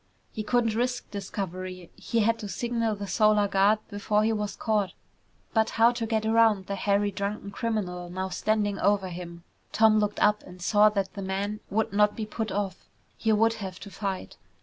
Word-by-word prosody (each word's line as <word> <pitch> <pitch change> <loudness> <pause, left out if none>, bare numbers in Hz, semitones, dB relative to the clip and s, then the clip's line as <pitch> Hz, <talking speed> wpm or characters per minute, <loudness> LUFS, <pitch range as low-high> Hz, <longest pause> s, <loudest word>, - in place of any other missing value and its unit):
He 215 - -3
couldn't 230 0 +1
risk 245 +2 -2
discovery. 185 -3 -5
He 230 - -1
had 230 +2 +2
to 210 - -5
signal 230 -1 -1
the 200 0 -5
Solar 210 0 +3
Guard 200 +2 +4
before 210 0 0
he 225 +1 +2
was 210 -1 -3
caught. 210 -4 0 0.6
But 220 -1 +3
how 230 +1 +6
to 235 -2 -3
get 220 -1 0
around 220 -3 +4
the 200 - -4
hairy, 200 +1 +1
drunken 200 +1 -4
criminal 190 -5 -3
now 185 +1 -3
standing 205 +1 0
over 195 -1 +2
him? 170 -1 -8 0.3
Tom 220 -1 +5
looked 210 -1 -1
up 210 0 +3
and 180 0 -13
saw 210 +4 +5
that 195 -2 -2
the 200 - -6
man 195 +2 -2
would 215 +1 0
not 210 0 +3
be 220 - -3
put 215 0 -4
off. 195 -2 -3 0.3
He 225 - 0
would 225 +1 +4
have 190 -1 -6
to 200 - -9
fight. 195 -2 -4
205 Hz, 190 wpm, -27 LUFS, 195-220 Hz, 0.6 s, how